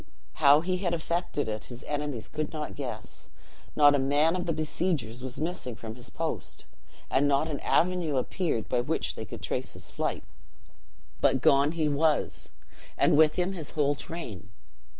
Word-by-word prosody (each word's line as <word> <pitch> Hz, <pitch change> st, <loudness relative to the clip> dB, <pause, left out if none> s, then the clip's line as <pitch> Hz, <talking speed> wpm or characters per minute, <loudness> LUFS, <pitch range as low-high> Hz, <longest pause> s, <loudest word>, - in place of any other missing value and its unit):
"'How 145 Hz, -, +6 dB
he 185 Hz, +2 st, 0 dB
had 175 Hz, -2 st, 0 dB
effected 170 Hz, -3 st, -2 dB
it, 110 Hz, -1 st, -4 dB
his 120 Hz, 0 st, -10 dB
enemies 145 Hz, -6 st, -3 dB
could 155 Hz, 0 st, -3 dB
not 150 Hz, -9 st, -4 dB
guess. -, -, -6 dB, 0.5 s
Not 145 Hz, -1 st, +7 dB
a 145 Hz, -, +3 dB
man 145 Hz, +5 st, +3 dB
of 180 Hz, -1 st, -2 dB
the -, -, +2 dB
besiegers 155 Hz, -6 st, -1 dB
was 130 Hz, 0 st, -5 dB
missing 155 Hz, -7 st, -3 dB
from 110 Hz, 0 st, -7 dB
his 125 Hz, +1 st, -10 dB
post; 165 Hz, -1 st, -5 dB, 0.5 s
and 140 Hz, +2 st, +3 dB
not 140 Hz, +2 st, +2 dB
an 150 Hz, -3 st, -3 dB
avenue 175 Hz, -5 st, +2 dB
appeared 130 Hz, -, -1 dB
by 125 Hz, -, +1 dB
which -, -, -1 dB
they -, -, -6 dB
could -, -, -9 dB
trace -, -, -3 dB
his -, -, -9 dB
flight: -, -, -2 dB, 1.0 s
but -, -, +4 dB
gone 140 Hz, +3 st, +4 dB
he 160 Hz, -2 st, +1 dB
was, 150 Hz, +1 st, +1 dB, 0.5 s
and -, -, +4 dB
with 155 Hz, 0 st, +5 dB
him 180 Hz, +2 st, 0 dB
his 160 Hz, -6 st, -5 dB
whole 145 Hz, -1 st, +3 dB
train. 125 Hz, -, -7 dB
150 Hz, 170 wpm, -28 LUFS, 135-165 Hz, 1.0 s, Not